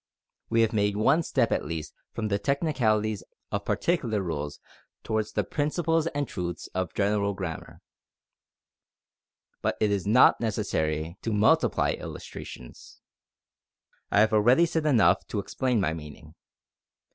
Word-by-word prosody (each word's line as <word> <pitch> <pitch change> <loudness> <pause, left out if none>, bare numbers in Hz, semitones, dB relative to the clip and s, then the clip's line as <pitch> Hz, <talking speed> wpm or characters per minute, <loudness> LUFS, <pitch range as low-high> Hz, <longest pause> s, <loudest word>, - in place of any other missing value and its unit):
We 115 0 +3
have 115 0 +2
made 105 -1 +1
one 135 +10 +4
step 130 -7 0
at - - +1
least 80 0 -5 0.2
from 110 -2 -3
the 100 0 0
technicalities 110 - 0 0.3
of - - -2
particular 120 -11 0
rules 75 -4 -4 0.4
towards 110 -1 -2
the - - +1
principles 165 +2 0
and 145 -4 -2
truths 85 -4 -5
of 95 -1 -3
general 100 0 +1
grammar. 90 -4 -6 1.8
But - - -1
it 105 -1 +2
is 100 -1 -1
not 120 +3 +5
necessary 80 -6 -2
to 115 - -2
multiply 105 +1 +3
illustrations. - - -9 1.1
I 100 - +4
have 110 0 +3
already 120 +10 +5
said 160 -2 -1
enough 100 - +4
to - - -4
explain 125 +4 0
my 80 -5 0
meaning. 75 -1 -10
105 Hz, 135 wpm, -27 LUFS, 90-125 Hz, 1.8 s, not